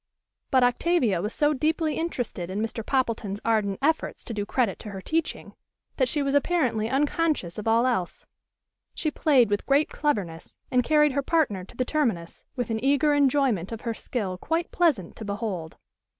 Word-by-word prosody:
But 260 -2 +4
Octavia 245 - +2
was 210 +3 -2
so 295 +3 +2
deeply 310 +2 0
interested 245 - -3
in 190 +2 -3
Mr. 225 +1 -3
Poppleton's 225 -6 -1
ardent 210 -4 +1
efforts 315 +2 0
to 235 - -6
do 205 -1 -3
credit 230 -7 0
to 210 - -8
her 195 -1 -6
teaching, 320 - -3 0.4
that 260 - +3
she 295 +2 0
was 275 0 0
apparently 265 -8 +1
unconscious 285 - 0
of 210 - -5
all 230 +2 +4
else. 190 -9 -1 0.7
She 310 - -1
played 260 -8 +3
with 205 - -1
great 280 +2 +3
cleverness, 195 - -2
and 250 -1 +3
carried 300 +1 +4
her 280 +2 0
partner 275 - +1
to - - -17
the 255 - 0
terminus, 230 - -1
with 245 -2 -2
an 220 +1 -2
eager 285 +2 +3
enjoyment 270 -9 +2
of 225 - -6
her 230 - -2
skill 200 -6 -4
quite 330 - -2
pleasant 285 - +1
to - - -7
behold. 200 -6 -4
245 Hz, 180 wpm, -26 LUFS, 205-295 Hz, 0.7 s, But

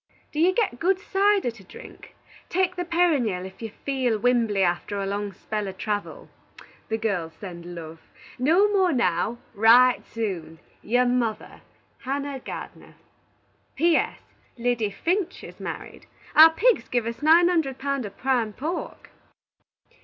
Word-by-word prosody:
Do 300 - -4
you 350 +3 +5
git 405 - 0
good 370 +2 +2
cyder 400 -6 +1
to 220 -3 -16
drink? 185 - -13 0.3
Take 365 0 0
the 355 0 -3
Pennyryal 295 - +1
if 190 +3 -12
you 225 - -4 0.2
feal 260 -5 0
wimbly 225 -3 +2
after 180 +3 -1
a 195 - -2
long 200 +1 -3
spell 210 +2 -4
of 190 -1 -7
travil. 205 0 -4 0.6
The 220 - 0
girls 195 -7 -2
send 175 -1 -9
love. 165 -1 -9 0.4
No 335 +11 +4
more 380 -3 +3
now. 235 - 0 0.2
Wright 235 +4 +5
soon. 185 -8 -5 0.2
"Your 245 +3 +2
mother, 245 -3 -2 0.4
HANNAH 275 +1 -3
GARDENER" - - -9 0.8
"P. 335 +3 +3
S. - - 0 0.4
Liddy 235 -3 0
Finch 360 - -2
is - - -11
married. - - -8 0.3
Our 320 +1 +10
pigs 445 +9 +2
give 240 -2 0
us 230 +3 -5
nine 330 +3 +6
hunderd 320 -7 0
pound 275 -1 -2
of 205 - -9
prime 245 -5 0
pork." 320 - -5
245 Hz, 145 wpm, -25 LUFS, 205-320 Hz, 0.8 s, Our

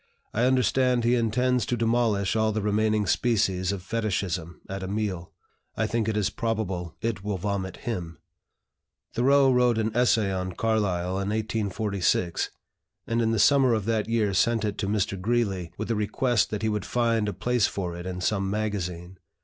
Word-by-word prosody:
I 115 +3 +2
understand 125 -1 +2
he 120 +1 +3
intends 125 +1 +1
to 120 - 0
demolish 115 -4 +1
all 110 0 +2
the 110 -1 -2
remaining 105 0 +1
species 95 -1 +1
of 100 -3 -5
Fetichism 95 -6 -2
at 95 0 -5
a 95 - -4
meal. 100 -4 -3 0.5
I 110 - +1
think 115 0 -1
it 110 - -1
is 105 -3 +1
probable 95 - -3
it 110 -4 -2
will 105 -2 -2
vomit 95 0 -3
him." 90 -8 -5 1.0
Thoreau 135 +3 +4
wrote 125 -2 +3
an 110 0 -1
essay 115 -5 +3
on 95 0 -3
Carlyle 95 -5 0
in 100 +1 -2
1846, 105 -4 -1 0.6
and 115 +1 0
in 115 - +2
the 115 - +1
summer 130 +2 +5
of 110 -3 -2
that 110 -1 0
year 110 -3 +1
sent 115 +2 +2
it 105 -1 -3
to 100 - -1
Mr. 100 -2 -1
Greeley, 100 -6 0
with 110 +2 -3
a - - +1
request 105 +2 +1
that 105 0 -4
he 110 - +2
would 105 -1 -1
find 115 -3 +1
a - - -1
place 125 -3 +1
for 90 -3 -4
it 90 +1 -7
in 90 0 -4
some 95 0 0
magazine. 95 -4 -3
105 Hz, 180 wpm, -26 LUFS, 95-115 Hz, 1.0 s, summer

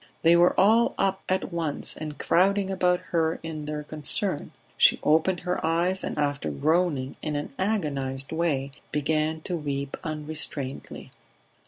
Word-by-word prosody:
They 165 +1 +6
were 175 +1 +4
all 220 +5 +4
up 195 0 +1
at 185 -1 -1
once 160 -4 -1
and 155 -1 -6
crowding 195 +2 +2
about 180 -1 +2
her 165 -1 +1
in 155 -2 -5
their 150 0 -4
concern; 150 -1 -1 0.2
she - - +5
opened 160 +4 +3
her 180 0 -2
eyes, 170 +4 +1
and - - -4
after 145 - -1
groaning 140 - 0
in 150 -1 -3
an 145 -1 -4
agonized 140 -10 -1
way 155 -5 0 0.2
began 155 +1 0
to 180 - -3
weep 140 -3 -3
unrestrainedly. 150 -3 -4
160 Hz, 145 wpm, -26 LUFS, 145-180 Hz, 0.2 s, They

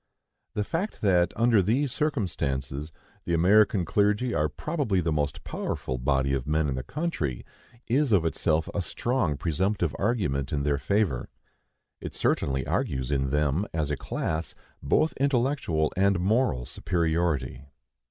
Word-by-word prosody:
The 105 - +1
fact 175 - -3
that, 90 -4 +3
under 115 -3 +4
these 125 +8 +1
circumstances, 75 - -2 0.3
the 85 - +1
American 100 +2 +4
clergy 105 +7 +1
are - - +1
probably 145 - -1
the 80 -2 0
most 75 -2 -1
powerful 65 -1 -3
body 70 +1 +1
of 65 -1 -2
men 75 0 +1
in 70 - -1
the 65 - -3
country, 75 - -3 0.4
is 135 +2 +1
of 95 -6 +4
itself 80 -1 +1
a 100 - 0
strong 100 - -1
presumptive 85 +1 0
argument 75 - 0
in 70 -1 0
their 70 0 +1
favor. 100 - 0 0.7
It - - -7
certainly 65 -2 0
argues 65 0 -1
in 70 -1 +1
them, 75 +7 +1
as 75 -2 -1
a - - +1
class, 80 +3 -3 0.3
both 155 - +2
intellectual 130 - +1
and 100 -1 +3
moral 100 - +1
superiority. 80 -3 -1
85 Hz, 145 wpm, -27 LUFS, 70-110 Hz, 0.7 s, under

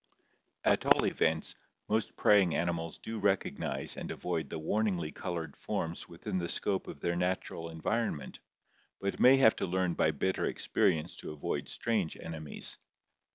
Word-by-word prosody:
At - - +3
all - - +5
events, - - +1 0.3
most 110 0 0
prey 105 -1 +6
ing 90 -4 +1
animals 85 -1 -1
do 110 0 -5
recognize 100 -1 0
and - - -5
avoid - - -2
the - - -4
warningly 90 -1 0
colored 85 -2 -4
forms 85 +1 -3
within 85 +2 -3
the 85 -1 -2
scope 95 -2 0
of 70 - -8
their 85 - 0
natural 90 -2 -2
environment, 80 - -2 0.6
but 100 0 -2
may 130 +2 +8
have 120 -5 +6
to - - -1
learn 90 0 +1
by 80 - +3
bitter 85 +5 0
experience 80 +1 +1
to - - -7
avoid 75 - -3
strange 105 -8 -1
enemies. 80 -2 -4
90 Hz, 155 wpm, -32 LUFS, 80-100 Hz, 0.6 s, may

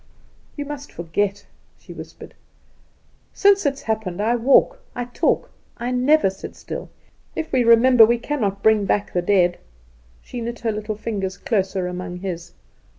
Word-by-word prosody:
"You 290 - -3
must 290 0 -7
forget," 195 +4 -2 0.3
she - - -12
whispered. - - -11 1.0
"Since 400 -5 +4
it 275 0 -2
happened 220 -6 -3
I 225 +3 +2
walk, 260 - +4 0.2
I 245 - -3
talk, 245 - 0 0.3
I 245 +1 -3
never 255 -2 +3
sit 190 - -10
still. - - -7 0.5
If 320 - -4
we 255 -2 +3
remember, 235 +1 +7
we 235 +2 +4
cannot 215 -7 -2
bring 220 -2 +4
back 205 +1 0
the 180 - +1
dead." 175 -1 +2 0.6
She 245 - -7
knit 235 +1 -5
her 230 -2 0
little 215 0 -4
fingers 200 -3 -4
closer 190 -3 -1
among 180 0 -5
his. 175 -2 -5
220 Hz, 155 wpm, -22 LUFS, 195-250 Hz, 1.0 s, remember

